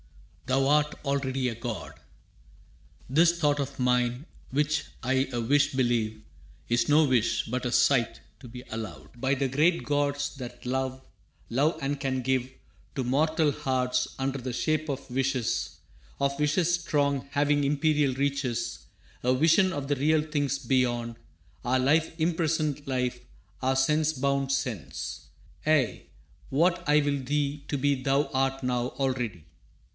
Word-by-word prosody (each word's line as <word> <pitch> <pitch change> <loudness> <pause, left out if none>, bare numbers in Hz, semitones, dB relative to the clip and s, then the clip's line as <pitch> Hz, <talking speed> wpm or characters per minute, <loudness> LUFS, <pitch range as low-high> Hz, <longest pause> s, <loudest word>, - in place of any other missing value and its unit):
thou 135 +1 +2
art 150 +1 +3
already 135 -2 0
a 115 - -2
god. 115 -1 -5 1.1
This 170 +5 +3
thought 145 -2 +2
of 140 -1 -4
mine, 125 +1 +1 0.2
which 150 +2 0 0.2
I 130 +1 +1
a 120 - -2
wish 145 +5 +3
believe, 115 -4 0 0.4
Is 120 +2 +1
no 155 +1 +6
wish, 125 -5 +1
but 125 +2 -3
a 125 - -1
sight, 120 -3 +3 0.2
to 125 - -11
me 125 +1 -9
allowed 110 +2 -7
By 135 +1 +2
the 135 0 0
great 155 +6 +2
gods, 145 0 0
that 125 -2 -8
love 130 +1 -2 0.5
love 145 +7 +1
and 140 +1 -2
can 130 -2 -1
give 130 0 0 0.5
To 135 - -1
mortal 155 +4 +2
hearts, 130 -2 0
under 135 +1 -2
the 125 0 -4
shape 155 +4 -1
of 140 -1 -4
wishes 130 -2 -1 0.4
Of 140 0 0
wishes 170 +4 +2
strong, 140 -4 0
having 145 0 +2
imperial 145 -1 +2
reaches 140 -3 -2 0.4
A 125 +1 +3
vision 165 +7 +4
of 145 -5 -4
the 145 - +1
real 150 +3 +2
things 145 -3 -1
beyond 120 -3 0 0.5
Our 130 +1 +2
life 155 +5 +3
imprisoned 155 -3 0
life, 125 -2 -1 0.4
our 130 +1 +1
sense 150 +4 +2
bound 140 0 0
sense. 125 -8 -3 0.4
Ay, 150 -7 +1 0.4
what 170 +6 +2
I 150 +1 +6
will 140 -2 -1
thee 145 +1 -1
to 145 - -1
be 140 -1 +1
thou 140 +1 +1
art 135 0 0
now 125 -1 0
Already. 120 - -2
135 Hz, 145 wpm, -28 LUFS, 125-145 Hz, 1.1 s, no